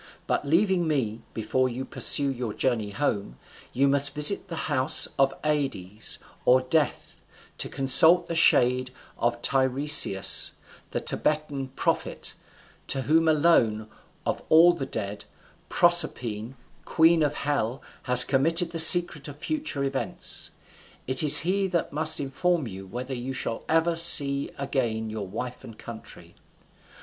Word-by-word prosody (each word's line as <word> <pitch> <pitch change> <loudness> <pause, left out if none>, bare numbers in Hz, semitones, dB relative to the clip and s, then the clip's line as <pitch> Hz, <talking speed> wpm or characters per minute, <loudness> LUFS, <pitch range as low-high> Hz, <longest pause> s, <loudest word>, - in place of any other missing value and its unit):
But - - -3
leaving 175 +2 0
me, 115 -8 -3
before 130 +4 -2
you 130 +2 -7
pursue 140 -1 0
your 120 -4 -6
journey 115 -5 -3
home, 100 - -4 0.3
you 135 +3 0
must 140 +1 0
visit 150 +8 +1
the 170 - -8
house 130 +5 0
of 135 0 +2
Ades, 130 -10 -3 0.3
or 130 +1 +3
Death, 145 +4 -3 0.4
to - - -2
consult 145 +6 +6
the - - -7
shade 125 -5 +1 0.3
of 120 0 -2
Tiresias 135 -6 +3 0.4
the - - -5
Theban 150 -3 -3
prophet; - - -4 0.5
to 135 - -2
whom 160 +3 0
alone, 120 -9 0 0.3
of - - -4
all 170 +2 +5
the 150 -6 -7
dead, 100 +1 -7 0.4
Proserpine, 130 -9 +1 0.3
queen 165 0 +1
of 150 -1 -2
hell, 135 -3 -4 0.2
has 125 0 +5
committed 165 +5 0
the 165 - -2
secret 160 -3 +6
of 145 -1 -11
future 290 - -5
events: 135 -1 -4 0.6
it 130 0 +1
is 150 -3 +7
he 195 +2 -1
that 175 -5 -4
must 155 +1 +1
inform 155 +3 -3
you 95 -2 -11
whether 125 +6 -8
you 130 +1 -7
shall 120 -3 -5
ever 165 +1 0
see 140 -4 +6
again 115 -5 -4
your 105 -3 -7
wife 125 +6 -8
and 115 - -13
country." 115 -2 -13
140 Hz, 140 wpm, -24 LUFS, 125-160 Hz, 0.6 s, is